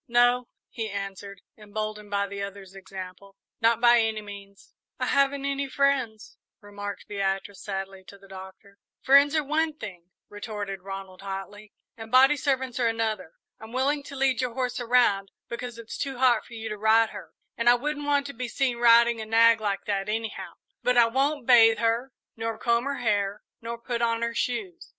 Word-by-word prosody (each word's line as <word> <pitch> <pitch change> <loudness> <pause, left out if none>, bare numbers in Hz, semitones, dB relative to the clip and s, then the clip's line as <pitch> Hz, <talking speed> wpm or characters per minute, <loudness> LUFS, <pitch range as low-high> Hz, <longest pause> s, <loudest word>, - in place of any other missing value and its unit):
"No," 245 0 +3 0.2
he 225 -3 -4
answered, 200 0 -6
emboldened 210 0 -6
by 200 0 0
the 200 0 -6
other's 200 -1 -7
example; 195 0 -10 0.3
"not 230 0 +3
by 240 0 +6
any 220 -1 -1
means." 200 -1 -12 0.3
"I - - 0
haven't 275 0 +1
any 280 0 -2
friends," 260 -6 0 0.2
remarked 205 -1 -8
Beatrice, 195 0 -3
sadly, 195 -1 -5
to 200 - -13
the 195 0 -18
Doctor. 190 +1 -12 0.2
"Friends 280 +3 +6
are 310 - +2
one 305 +2 0
thing," 180 - -9 0.2
retorted 205 -2 -6
Ronald, 195 -1 -8
hotly, 200 +2 -7 0.2
"and 225 -1 -10
body 265 +3 +6
servants 260 -3 -1
are 240 - +2
another. 225 -7 -2 0.3
I'm 220 +1 -11
willing 280 +3 +1
to 280 - -9
lead 265 -2 +1
your 245 -2 -3
horse 255 -2 -2
around, 235 -5 +2 0.2
because 235 0 -6
it's 230 -1 -8
too 270 -2 -3
hot 245 -3 +3
for 235 - -11
you 225 0 -6
to 210 -1 -6
ride 220 +1 +4
her, 205 -2 -11 0.2
and 235 +1 +3
I 240 - +7
wouldn't 290 +3 -3
want 285 -1 +2
to 280 - -6
be 250 +1 -4
seen 250 0 -1
riding 235 -1 +5
a - - -5
nag 230 0 +5
like 200 -2 -2
that 200 0 -2
anyhow; 225 0 -4 0.3
but 250 0 +1
I 240 - +7
won't 270 +3 0
bathe 225 -3 +7
her 230 +3 0 0.2
nor 225 0 -3
comb 235 +2 +1
her 280 0 -2
hair 205 -3 -1 0.2
nor 235 +1 -5
put 235 0 -4
on 230 0 +1
her 235 0 -1
shoes." 345 - -3
230 Hz, 185 wpm, -26 LUFS, 200-250 Hz, 0.3 s, I